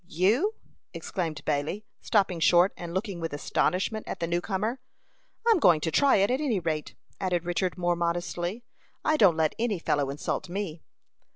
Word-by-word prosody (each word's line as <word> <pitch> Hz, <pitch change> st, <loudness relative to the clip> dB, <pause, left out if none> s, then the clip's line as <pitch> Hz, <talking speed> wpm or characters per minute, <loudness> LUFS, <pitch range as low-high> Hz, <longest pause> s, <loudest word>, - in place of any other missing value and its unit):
"You?" 225 Hz, -, +2 dB, 0.4 s
exclaimed 165 Hz, -6 st, -4 dB
Bailey, 155 Hz, +8 st, -1 dB
stopping 195 Hz, -5 st, +1 dB
short, 175 Hz, +3 st, +5 dB
and 175 Hz, -1 st, -7 dB
looking 190 Hz, 0 st, -3 dB
with 165 Hz, -2 st, -4 dB
astonishment 190 Hz, +8 st, -1 dB
at -, -, -5 dB
the 170 Hz, -, 0 dB
new 170 Hz, +1 st, 0 dB
comer. 215 Hz, +6 st, -2 dB, 0.7 s
"I -, -, +7 dB
am 435 Hz, -, +4 dB
going 165 Hz, -, +5 dB
to 160 Hz, -, -1 dB
try 280 Hz, -, +4 dB
it, 200 Hz, +3 st, +3 dB
at 260 Hz, +3 st, 0 dB
any 245 Hz, -10 st, +1 dB
rate," 155 Hz, -3 st, -3 dB, 0.2 s
added 180 Hz, -3 st, -1 dB
Richard, 175 Hz, +1 st, -1 dB
more 175 Hz, -1 st, +1 dB
modestly. 175 Hz, +5 st, -2 dB, 0.4 s
"I 310 Hz, -, +3 dB
don't 190 Hz, -, +5 dB
let 160 Hz, -1 st, +2 dB
any 225 Hz, -4 st, 0 dB
fellow 145 Hz, -4 st, 0 dB
insult 145 Hz, +5 st, -3 dB
me." 175 Hz, -4 st, -4 dB
180 Hz, 175 wpm, -27 LUFS, 165-210 Hz, 0.7 s, I